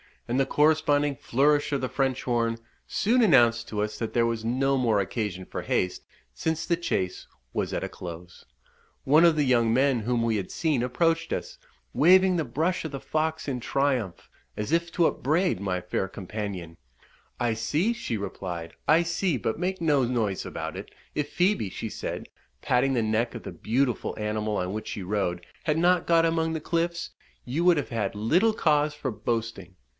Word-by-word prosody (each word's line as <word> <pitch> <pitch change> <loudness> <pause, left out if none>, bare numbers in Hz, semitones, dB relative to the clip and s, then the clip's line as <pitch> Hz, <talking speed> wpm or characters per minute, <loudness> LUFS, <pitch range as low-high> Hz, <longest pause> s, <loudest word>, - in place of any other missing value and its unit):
and 125 +3 0
the 135 - +3
corresponding 145 -1 +3
flourish 145 +4 +2
of 140 - 0
the 130 - -2
French 135 -2 -1
horn, 115 -2 0 0.3
soon 245 +5 +2
announced 120 - +4
to 105 -1 -2
us 105 0 -3
that 115 - -3
there 120 -1 +3
was 115 -1 -2
no 135 +3 +1
more 115 -5 +2
occasion 95 -2 -3
for - - -5
haste, 90 0 -1 0.3
since 160 0 -2
the 170 - +1
chase 95 - -2 0.3
was - - -1
at - - -2
a - - -3
close. 85 0 -9 0.6
One 155 +5 +5
of 165 -2 +5
the 150 - +2
young 120 -4 +3
men 130 0 +3
whom 115 +1 0
we 115 -2 +1
had 95 - -4
seen 155 -7 0
approached 165 +7 +1
us, - - -5 0.3
waving 185 +3 +5
the 160 - 0
brush 160 +9 -1
of 160 - -4
the 135 - -5
fox 155 +2 -2
in 130 -2 -2
triumph, 125 -8 -1 0.3
as 105 +6 -4
if 170 +1 +1
to 170 - +3
upbraid 160 - +1
my 90 -2 -2
fair 90 +2 -2
companion, 95 -3 -6 0.6
"I 120 -2 +1
see," 150 - 0
she 230 - -3
replied, 90 -4 -5
"I 160 +4 +5
see; 170 -2 0
but 110 +4 -2
make 185 0 -2
no 150 -5 +3
noise 115 -6 -1
about - - -5
it: - - -7 0.2
if 150 -1 -2
Phoebe," 180 - +2
she - - -5
said, - - -5 0.3
patting 135 +2 +2
the 120 -3 +1
neck 110 +3 0
of 115 - -7
the - - -6
beautiful 125 +1 -1
animal 105 0 -1
on 90 0 -2
which 110 - -5
she 100 - -5
rode, 90 -3 -2 0.2
"had 155 0 +1
not 175 +1 +3
got 165 -1 +4
among 165 0 +1
the 160 - -3
cliffs, 170 +1 -1 0.3
you 150 +8 -1
would 175 -2 +6
have 145 - -2
had 110 -4 -2
little 170 - +3
cause 150 -5 +2
for 135 -3 -3
boasting." 110 -4 -3
125 Hz, 190 wpm, -26 LUFS, 110-160 Hz, 0.6 s, would